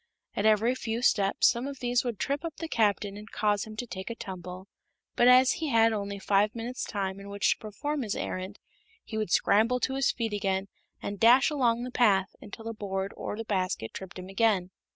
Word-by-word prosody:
At 205 - +2
every 220 +3 +4
few 235 -2 -3
steps 200 -4 +3
some 240 +3 +1
of 280 -1 -6
these 245 -1 +1
would 240 -4 -3
trip 280 +7 -2
up 330 -2 -5
the 330 - -5
Captain 205 -5 0
and 210 +1 -10
cause 205 -1 0
him 215 0 -10
to 245 - -4
take 190 -3 -7
a 230 - -4
tumble, 185 -4 -8 0.5
but 240 - +4
as 255 +1 +7
he 320 - -2
had 225 -2 +4
only 200 -1 -3
five 205 +3 +2
minutes' 235 +2 -4
time 195 -2 -3
in 200 0 -10
which 200 0 +1
to - - -1
perform 290 +8 -4
his 215 -4 -2
errand 185 +2 -4 0.5
he 220 - -8
would 215 -3 -1
scramble 225 +7 +3
to 265 - 0
his 270 0 +2
feet 225 -3 -3
again 195 -1 -1 0.3
and 200 -1 -4
dash 245 +6 +6
along 240 -5 +1
the 250 - -5
path 200 -6 +2
until 225 +2 -9
a 230 - -3
board 195 -2 -4
or 210 - -5
the 225 - -4
basket 185 - -2
tripped 190 -1 -8
him 185 0 -8
again. 195 -2 +1
215 Hz, 215 wpm, -28 LUFS, 195-240 Hz, 0.5 s, as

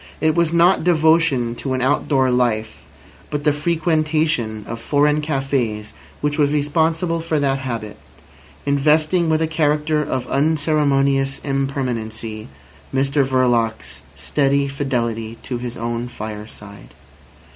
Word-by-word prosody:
It 155 +1 +2
was 170 -1 +1
not 170 +2 +4
devotion 160 -7 +3
to 135 - -3
an 130 - -2
outdoor 135 -1 +2
life, 115 -3 0 0.5
but 145 -1 -3
the 150 -1 +3
frequentation 155 -7 0
of 115 0 -5
foreign 145 +5 +2
cafés 135 -8 -2 0.3
which 150 +1 -1
was 145 -1 +4
responsible 160 +3 0
for 160 -2 -1
that 135 -1 +1
habit, 115 -5 -5 0.7
investing 155 +4 +2
with 160 0 +2
a - - +1
character 150 -1 +1
of 130 -3 -3
unceremonious 140 -2 +1
impermanency 120 -6 -3 0.4
Mr 135 +1 +1
Verloc's 120 -4 0
steady 140 -1 +1
fidelity 115 -5 -2
to 125 -2 -4
his 120 0 -6
own 120 +1 -3
fireside. 105 -3 -9
140 Hz, 120 wpm, -20 LUFS, 120-155 Hz, 0.7 s, not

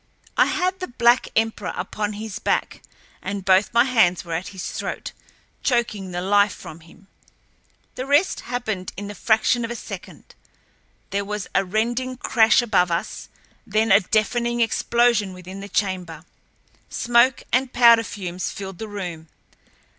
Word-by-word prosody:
I - - +5
had 370 +1 -1
the 365 - -4
black 240 0 +3
emperor 220 -3 0
upon 205 +3 -3
his 210 0 -6
back, - - -1 0.4
and 195 0 -5
both 190 +1 +4
my 235 0 +5
hands 220 -10 +2
were 170 - -5
at 175 +3 -3
his 190 -2 -6
throat, - - -5 0.5
choking 230 -6 0
the 175 0 -4
life 205 +1 +3
from 160 - -11
him. 170 +4 -19 0.9
The 255 - -5
rest 290 +7 +3
happened 220 -7 -4
in 205 - -5
the - - -6
fraction 220 +4 +2
of 230 - -3
a 240 - -4
second. - - -10 0.8
There 200 0 -1
was 210 0 -4
a 195 - +3
rending 240 +6 -1
crash 230 0 +4
above 190 -6 +2
us, 170 0 -4 0.4
then 215 +1 +1
a - - +8
deafening 235 +4 0
explosion 235 -3 +2
within 185 +1 -9
the 200 +1 -8
chamber. 185 -4 -2 0.6
Smoke 240 +2 +3
and 255 +1 +2
powder 235 -2 +6
fumes 185 -4 -5
filled 195 -2 -8
the 220 - -5
room. 175 -6 -6
210 Hz, 155 wpm, -22 LUFS, 190-235 Hz, 0.9 s, a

